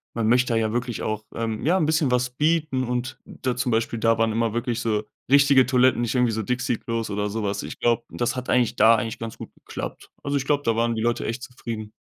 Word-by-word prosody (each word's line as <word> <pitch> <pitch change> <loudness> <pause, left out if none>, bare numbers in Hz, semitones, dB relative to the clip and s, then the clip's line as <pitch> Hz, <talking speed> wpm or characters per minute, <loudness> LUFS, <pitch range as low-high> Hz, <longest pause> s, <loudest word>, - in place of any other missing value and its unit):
man 115 -2 0
möchte 125 +1 +3
da - - +2
ja 110 0 0
wirklich 120 -1 -2
auch, 110 0 -2
ähm, 110 -2 -3
ja 170 +7 +3
'n 160 - +2
bisschen 155 -2 +2
was 125 0 +1
bieten 150 -1 +1
und 125 +1 -3
da 130 -2 -3
zum 125 0 -1
Beispiel, 115 0 0
da 115 0 +3
waren 115 0 +2
immer 115 0 0
wirklich 120 0 -1
so 110 -2 0 0.3
richtige 140 -2 +6
Toiletten, 125 -1 +3
nicht 120 +1 -1
irgendwie 125 -2 +3
so 110 0 -2
Dixie-Klos 115 -1 -2
oder 105 +1 -1
so 110 +1 -3
was. 100 0 -2
Ich - - -8
glaube, 120 0 +2
das 120 +2 -2
hat 125 0 -5
eigentlich 125 -2 +2
da 115 +2 +6
eigentlich 115 -1 -3
ganz 115 -1 -6
gut - - -10
geklappt. - - -8
Also, 140 0 0
ich 135 - -3
glaube, 145 0 +1
da 115 - +2
waren 115 0 +1
die 110 - -2
Leute 120 0 0
echt 115 +3 -4
zufrieden. 115 -3 -7
120 Hz, 245 wpm, -24 LUFS, 115-130 Hz, 0.3 s, richtige